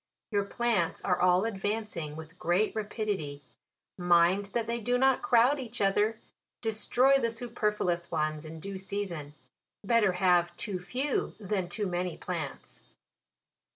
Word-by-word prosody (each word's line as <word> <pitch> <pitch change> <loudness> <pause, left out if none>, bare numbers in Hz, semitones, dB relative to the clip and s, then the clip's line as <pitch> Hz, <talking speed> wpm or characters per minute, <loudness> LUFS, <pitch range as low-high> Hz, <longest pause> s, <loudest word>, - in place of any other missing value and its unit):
Your 200 -1 +1
plants 215 -5 0
are 180 -2 +1
all 180 +2 +4
advancing 205 -7 -3
with 160 0 -8
g;reat 180 +4 +1
rapidity; 205 -9 -3 0.6
mind 175 +3 +4
that 230 +3 -2
they 235 +1 -2
do 245 +3 +1
not 265 0 +3
crowd 250 +5 +4
each 240 -2 -6
other; 205 +3 +2 0.4
destroy 245 +4 +3
the 230 - +1
superfluous 210 -7 -1
ones 155 -1 -1
in 160 0 -8
due 195 +3 -6
season. 185 -7 -4 0.5
Better 210 -3 +3
have 175 -1 +2
too 195 -4 -3
few 255 +10 -2
than 195 -3 -2
too 210 +3 -2
many 180 -1 -2
plants. 165 -6 -5
200 Hz, 135 wpm, -30 LUFS, 175-225 Hz, 0.6 s, all